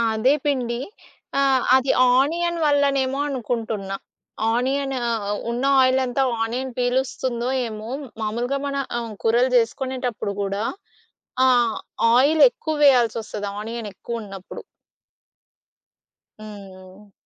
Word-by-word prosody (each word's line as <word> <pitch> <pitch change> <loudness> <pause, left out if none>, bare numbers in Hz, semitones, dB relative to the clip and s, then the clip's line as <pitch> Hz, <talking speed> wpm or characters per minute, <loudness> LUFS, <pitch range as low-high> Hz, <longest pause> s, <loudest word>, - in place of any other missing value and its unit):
అదే 255 +6 +3
పిండి. 245 -4 0 0.6
ఆహ్, 270 -2 +3
అది 265 0 +2 0.2
ఆనియన్ 340 +5 +1
వల్లనేమో 280 -2 +2
అనుకుంటున్నా. 220 -6 -3 0.6
ఆనియన్ 270 +3 0
ఆహ్, 225 -3 -1 0.3
ఉన్న 240 +3 -2 0.2
ఆయిలంతా 260 0 +2 0.2
ఆనియన్ 250 +3 -3
పీలుస్తుందో, 250 -1 -1 0.2
ఏమో 215 0 -7 0.3
మామూలుగా 240 +6 -1
మన 280 0 -3 0.2
ఆహ్, 230 -2 -5
కూరలు 240 +3 +3
జేసుకునేటప్పుడు 245 -3 -1
గూడా 200 +2 -2 0.8
ఆహ్, 240 -3 +3 0.4
ఆయిల్ 290 +5 +4
ఎక్కువ 315 -9 -4
వేయాల్సి‌సోస్తది 230 -5 +2
ఆనియన్ 225 0 -5
ఎక్కువ 230 +4 -6
ఉన్నప్పుడు. 195 -2 -9 1.8
హ్మ్. 200 -1 -12
245 Hz, 95 wpm, -22 LUFS, 220-265 Hz, 1.8 s, ఆయిల్